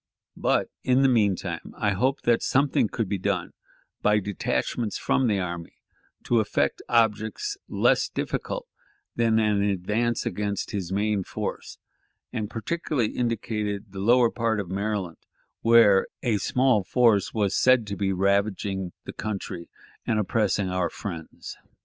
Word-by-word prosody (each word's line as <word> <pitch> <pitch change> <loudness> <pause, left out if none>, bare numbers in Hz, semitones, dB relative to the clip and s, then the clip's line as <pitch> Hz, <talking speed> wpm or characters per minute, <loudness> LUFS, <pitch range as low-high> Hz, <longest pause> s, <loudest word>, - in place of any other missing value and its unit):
But - - 0
in 130 +1 +3
the - - +6
mean 105 -6 +3
time 85 -3 -6
I 105 - +1
hoped 130 +8 0
that 120 -1 +3
something 135 -4 +2
could 115 - -2
be 100 0 -2
done - - -2 0.5
by 105 0 +4
detachments 105 +2 -2
from 130 - +1
the 105 -3 +2
army 85 -2 -5 0.5
to 120 - +2
effect 110 - 0
objects 115 - +1
less - - +2
difficult - - -3 0.5
than 115 -1 +2
an 105 -2 +2
advance 105 +4 0
against 100 +1 -2
his 95 -3 -4
main 105 0 0
force, - - -5 0.6
and 105 -1 -3
particularly 125 0 -2
indicated 105 -4 -2
the 95 - -7
lower 120 +3 +4
part 115 -2 0
of 95 -3 -5
Maryland, 100 -3 -2 0.4
where 115 -4 +6 0.2
a 115 -5 +2
small 125 -4 +2
force 110 -2 +3
was 105 -3 0
said 130 -3 +4
to 100 -1 -4
be 95 +1 0
ravaging 95 -1 0
the - - -8
country 100 -5 -5 0.4
and 110 - +1
oppressing 105 -2 +1
our 90 -2 0
friends. 85 -5 -7
105 Hz, 145 wpm, -26 LUFS, 100-115 Hz, 0.6 s, the